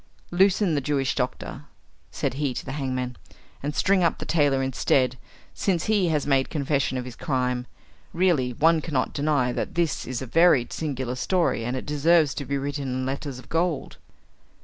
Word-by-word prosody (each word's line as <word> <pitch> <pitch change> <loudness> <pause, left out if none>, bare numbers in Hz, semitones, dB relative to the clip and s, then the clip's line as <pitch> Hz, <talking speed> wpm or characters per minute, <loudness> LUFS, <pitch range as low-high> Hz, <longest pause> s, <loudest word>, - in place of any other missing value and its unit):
"Loosen 190 0 +3
the 145 - +1
Jewish 135 -1 0
doctor," - - -4 0.4
said - - -2
he 135 -2 -2
to - - -5
the - - -5
hangman, 130 -3 -3 0.4
"and 145 +2 -3
string 195 -2 +3
up 170 - +2
the - - -6
tailor 145 -4 +2
instead, 130 0 +1 0.4
since 180 -5 0
he 205 -4 +2
has 150 -3 0
made 135 -2 +2
confession 140 -3 0
of 125 - -4
his 125 -2 -8
crime. 125 -2 -1 0.4
Really, 165 -8 +2
one 160 +6 +3
cannot 145 -5 -1
deny 140 -4 +1
that - - -4
this 170 -3 0
is 125 -2 -3
a 130 - -5
very 155 -1 +4
singular 130 -5 -3
story, 165 -1 0
and 125 +3 -2
it - - -6
deserves 150 0 +3
to 140 - -5
be 140 +2 -1
written 140 0 -3
in 130 0 -2
letters 135 0 -4
of 130 - -12
gold." 165 -3 -1
140 Hz, 180 wpm, -25 LUFS, 130-165 Hz, 0.4 s, very